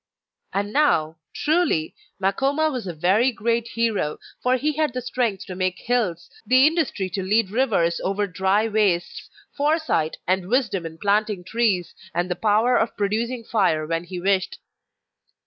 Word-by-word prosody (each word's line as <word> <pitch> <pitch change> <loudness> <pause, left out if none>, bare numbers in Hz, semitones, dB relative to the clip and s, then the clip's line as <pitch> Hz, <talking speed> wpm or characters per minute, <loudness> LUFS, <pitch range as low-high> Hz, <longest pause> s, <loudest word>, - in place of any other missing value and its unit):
And 205 +1 -2
now, 165 - +2
truly, 305 - +1 0.3
Makoma 275 +11 +1
was 250 -7 -4
a 175 - -4
very 195 +11 +3
great 230 +1 -1
hero; 225 -10 -1 0.2
for 255 +1 +2
he 300 +4 0
had 305 -3 0
the 255 - -3
strength 235 -6 -1
to 185 - -7
make 185 0 -1
hills, 215 -9 -1 0.2
the 255 +2 +5
industry 310 - +1
to 195 - -2
lead 200 +1 +1
rivers 205 -9 +1
over 200 +2 0
dry 195 +3 +1
wastes, 205 -5 0 0.3
foresight 295 - 0
and 185 0 0
wisdom 215 -9 0
in 160 0 -11
planting 205 0 0
trees, 200 -3 0 0.2
and 175 +1 -1
the - - 0
power 220 +6 +3
of 225 - -1
producing 230 +4 -1
fire 190 -9 +1
when 165 +2 -2
he 180 0 -6
wished. 195 - 0
210 Hz, 155 wpm, -23 LUFS, 185-245 Hz, 0.3 s, the